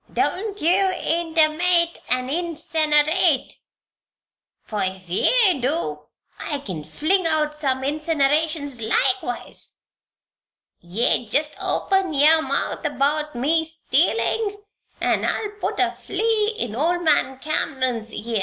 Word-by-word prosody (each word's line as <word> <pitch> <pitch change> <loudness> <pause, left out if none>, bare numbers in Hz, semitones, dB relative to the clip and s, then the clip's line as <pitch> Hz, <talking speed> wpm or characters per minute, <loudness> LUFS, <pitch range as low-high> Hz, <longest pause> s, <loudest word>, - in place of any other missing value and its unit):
"Don't 410 +1 -1
ye 370 +1 +2
intermate 340 +1 +2
an' 255 0 0
insinerate; 315 -1 +1 1.1
for 210 -2 -4
if 185 -1 -4
ye 370 - +3
do, 240 - -2 0.3
I 295 - -3
kin 185 - -6
fling 320 - 0
out 305 -1 0
some 270 -3 -1
insinerations 295 -2 0
likewise. 380 - -1 1.0
Yeou 215 +5 0
jest 295 +4 +1
open 385 -4 0
yer 310 +3 +5
mouth 275 +2 -2
about 295 0 -1
me 310 +7 +1
stealin' 320 - 0 0.4
an' - - +1
I'll 420 -2 -1
put - - -2
a - - +2
flea 435 +1 -1
in 225 -3 -3
old 345 +6 0
man 290 -4 +2
Cameron's 260 -5 -2
ear. 225 0 -3
305 Hz, 110 wpm, -22 LUFS, 260-340 Hz, 1.1 s, yer